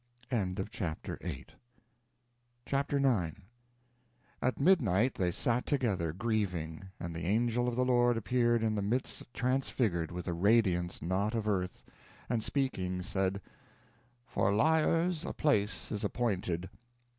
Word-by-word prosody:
CHAPTER 80 -6 -4
IX 70 -1 -6 2.9
At 130 - 0
midnight 130 - +4
they 90 -2 0
sat 120 +7 0
together, 105 - +1
grieving, 90 -5 -2
and 85 -1 -5
the 85 - -5
angel 120 +4 +2
of 120 - -1
the 125 +1 +2
Lord 120 -1 +3
appeared 120 0 +2
in 110 -1 +1
the 105 - -1
midst 115 +6 -1
transfigured 125 -9 0
with 90 0 -6
a 90 - 0
radiance 90 -3 +2
not 100 +6 0
of 110 -2 -1
earth; 90 -3 -1 0.5
and 120 -2 +1
speaking, 95 -10 -1
said: 95 +1 -1 0.9
"For 100 -5 +1
liars 160 - +2
a - - -4
place 105 -9 +1
is 105 -1 -2
appointed. 95 -6 -1
110 Hz, 120 wpm, -32 LUFS, 90-125 Hz, 2.9 s, midnight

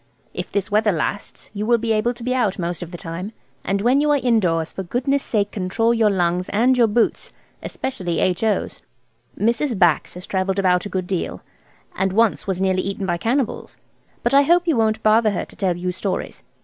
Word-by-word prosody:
If - - -6
this 200 +1 -2
weather 210 0 +3
lasts 195 +4 -4
you 205 0 -3
will 240 0 +4
be 230 0 0
able 235 +3 0
to 235 - -11
be 255 +1 0
out 235 -7 0
most 175 -2 -3
of 175 - -6
the 175 - -8
time, 175 +6 -6 0.3
and 195 +1 -1
when 255 +4 +4
you 300 - +1
are 295 - +4
indoors 190 - +1
for - - -4
goodness' 260 +9 0
sake 205 -6 -1
control 220 +4 0
your 225 -2 +3
lungs 180 -2 0
and 245 +5 +3
your 240 -2 +4
boots, 225 +2 0 0.3
especially 185 -10 -4
H.O.'s. 200 +4 0 0.6
Mrs. 235 +2 0
Bax 175 -3 +2
has 180 - -7
travelled 190 0 -1
about 185 0 +2
a - - -10
good 185 -2 -2
deal, 185 -1 -3 0.5
and 190 0 0
once 225 0 +2
was 190 -2 -1
nearly 190 -1 +1
eaten 195 0 -4
by 175 -2 0
cannibals. 240 +5 -2 0.5
But - - +1
I 280 - +7
hope 345 +4 +3
you 325 - +3
won't 220 -1 +1
bother 215 +1 +4
her 200 - -2
to - - -17
tell 185 -4 -1
you 180 +1 -2
stories. 185 +1 -4
205 Hz, 205 wpm, -21 LUFS, 185-235 Hz, 0.6 s, I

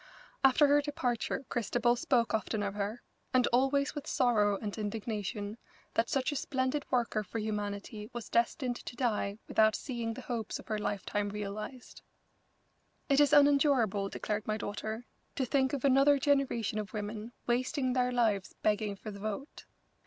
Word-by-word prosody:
After 270 +2 +6
her 290 +1 +5
departure 275 -4 -2
Christabel 240 +1 +1
spoke 235 -2 +1
often 220 -1 -1
of 200 -1 -2
her, 210 +3 -3 0.3
and 250 -1 +5
always 275 +3 +3
with 295 -1 -6
sorrow 210 -5 +3
and 205 -2 -4
indignation 210 0 -4 0.3
that 230 - +1
such 270 +1 +1
a - - -3
splendid 265 +1 -1
worker 235 -4 +1
for 220 - -6
humanity 210 0 -4
was 240 -3 -6
destined 245 +1 +1
to - - -8
die 215 -5 0
without 215 -1 +4
seeing 235 -4 -3
the 260 - -7
hopes 235 -4 -3
of - - -12
her 215 -1 0
lifetime 205 0 -2
realised. 210 +5 -6 1.1
"It 275 0 +5
is 290 -1 +5
unendurable," 275 -9 +4
declared 210 +1 -3
my 215 0 0
daughter, 220 +3 -4 0.3
"to 265 - 0
think 265 +1 +2
of 280 -2 -2
another 275 +1 +5
generation 265 -6 +1
of 210 -1 -6
women 215 +2 -5
wasting 255 +2 0
their 250 -1 +2
lives 220 -6 +1
begging 210 -1 +1
for 215 +2 -8
the 200 - -9
vote. 215 +7 -5
235 Hz, 160 wpm, -32 LUFS, 210-260 Hz, 1.1 s, After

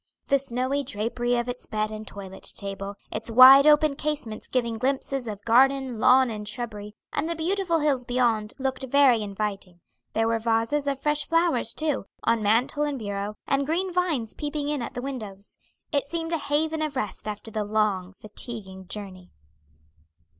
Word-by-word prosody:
The 275 - +4
snowy 260 +2 -1
drapery 240 0 -1
of 240 0 -1
its 245 0 -5
bed 215 0 -2
and 215 0 -7
toilet 190 -1 -3
table, 200 0 -5 0.2
its - - -2
wide 260 +4 +9
open 300 -1 +5
casements 285 -8 -3
giving 235 -3 -1
glimpses 270 0 -1
of 205 -2 -7
garden, 260 0 +3
lawn, 255 +1 +5
and 210 -1 -6
shrubbery, 210 -3 -6 0.2
and 315 +3 -1
the 335 - 0
beautiful 340 0 +1
hills 280 -4 +1
beyond, 235 -3 0
looked 265 0 -2
very 265 -3 +4
inviting. 200 -3 -4 0.3
There 225 +1 +1
were 230 0 +1
vases 230 +6 0
of 275 -1 -1
fresh 295 +1 +1
flowers 330 -9 +3
too, 295 -4 -2 0.2
on 230 -1 +2
mantel 230 +7 +2
and 295 -2 0
bureau, 205 -2 -4
and 275 0 +1
green 360 +4 -1
vines 320 -11 0
peeping 295 -1 -3
in 295 -3 -1
at 235 - -6
the 245 - -4
windows. 215 -7 -7 0.3
It 285 -2 0
seemed 330 +1 -4
a 330 - 0
haven 310 +2 0
of 305 -2 -2
rest 215 -4 -4
after 210 +1 -6
the 215 -1 -2
long, 205 -3 0
fatiguing 200 -3 -8
journey. 185 -3 -8
245 Hz, 170 wpm, -25 LUFS, 215-285 Hz, 0.3 s, wide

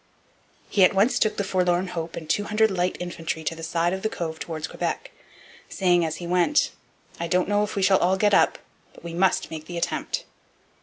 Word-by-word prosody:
He 200 - +3
at 185 - +5
once 205 +6 +3
took 215 -1 +1
the 200 - 0
'Forlorn 180 -1 +1
Hope' 165 -2 -5
and 160 - -7
200 210 +4 +2
light 180 -1 0
infantry 165 -2 -4
to 160 - -1
the 165 - -10
side 165 +2 0
of 190 - -3
the 220 - 0
Cove 160 -5 -5
towards 160 -2 -4
Quebec, - - -4 0.6
saying 175 -2 +2
as 160 -1 -2
he 175 - -7
went, 180 - +2 0.5
'I 170 - -2
don't 180 +1 +1
know 205 +1 +2
if 210 - -4
we 195 - 0
shall 190 0 +5
all 185 +2 +2
get 205 +1 +2
up, - - +4 0.4
but - - -16
we 170 -1 -6
must 185 +2 +1
make 155 -1 -7
the 175 - -5
attempt.' - - -2
180 Hz, 210 wpm, -25 LUFS, 165-195 Hz, 0.6 s, at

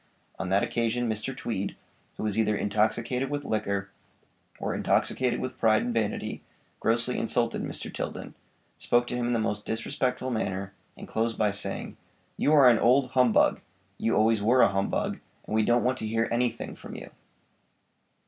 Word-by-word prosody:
On 90 - -3
that 100 +1 +3
occasion 120 +1 0
Mr. 110 +4 -3
Tweed, 100 -7 -3 0.4
who - - -4
was 105 -2 -1
either 105 -1 +2
intoxicated 115 +6 0
with 145 0 -3
liquor, 100 -2 -2 0.7
or - - -2
intoxicated 125 -1 +1
with 130 - -5
pride 110 -1 +4
and 120 - -2
vanity, 110 -3 -2 0.4
grossly 120 +2 +1
insulted 115 0 0
Mr. - - -6
Tilden, - - -5 0.5
spoke 120 0 +2
to 125 - -4
him 120 -1 -1
in 120 - +1
the 115 - +1
most 105 -1 -2
disrespectful 125 +3 -2
manner, 100 -4 -2 0.2
and - - -9
closed 115 +1 -1
by 105 -2 +2
saying: 100 - -4 0.4
"YOU 145 - +1
ARE 145 -4 +7
AN 120 -3 +6
OLD 125 +2 +3
HUMBUG; 125 -3 +3 0.4
YOU 115 - +1
ALWAYS 110 0 +3
WERE 125 +5 +4
A - - +5
HUMBUG, 100 0 -1 0.3
AND 110 - -3
WE 110 - +4
DON'T 120 +2 +3
WANT 130 +1 0
TO 110 - -3
HEAR 115 +1 0
ANYTHING 120 0 -1
FROM - - -10
YOU!" - - -9
115 Hz, 170 wpm, -27 LUFS, 105-125 Hz, 0.7 s, ARE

